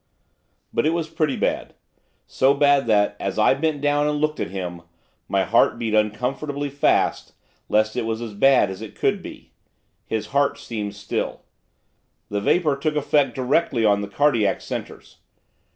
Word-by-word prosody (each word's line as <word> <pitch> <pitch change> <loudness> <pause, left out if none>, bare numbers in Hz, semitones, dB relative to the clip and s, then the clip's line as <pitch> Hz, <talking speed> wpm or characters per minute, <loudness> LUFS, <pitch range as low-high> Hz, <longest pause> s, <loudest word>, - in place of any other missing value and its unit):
But - - +1
it 165 - +1
was 165 -2 -2
pretty 155 -4 0
bad, - - -2 0.5
so 135 +2 +2
bad 140 -2 +3
that, 105 -2 +2
as - - -3
I - - +5
bent 150 +1 -1
down 145 0 +2
and 150 0 0
looked 155 0 -1
at - - -2
him, 90 -2 -5 0.5
my - - +2
heart - - +3
beat 115 -2 -3
uncomfortably 135 +7 -1
fast 140 - +1 0.4
lest 110 +1 +2
it 125 - 0
was 110 0 -2
as 115 -3 -6
bad 130 0 +4
as 95 - -8
it 110 - -9
could - - 0
be. - - -11 0.6
His 110 -1 -2
heart 140 0 +2
seemed 105 -3 -5
still, 100 0 -4 0.9
the 100 0 -2
vapour 150 - +2
took 150 +2 -1
effect 145 -3 +1
directly 130 -2 +1
on 100 -1 +3
the 100 - -4
cardiac 115 -4 +1
centres. - - -7
130 Hz, 165 wpm, -22 LUFS, 105-145 Hz, 0.9 s, I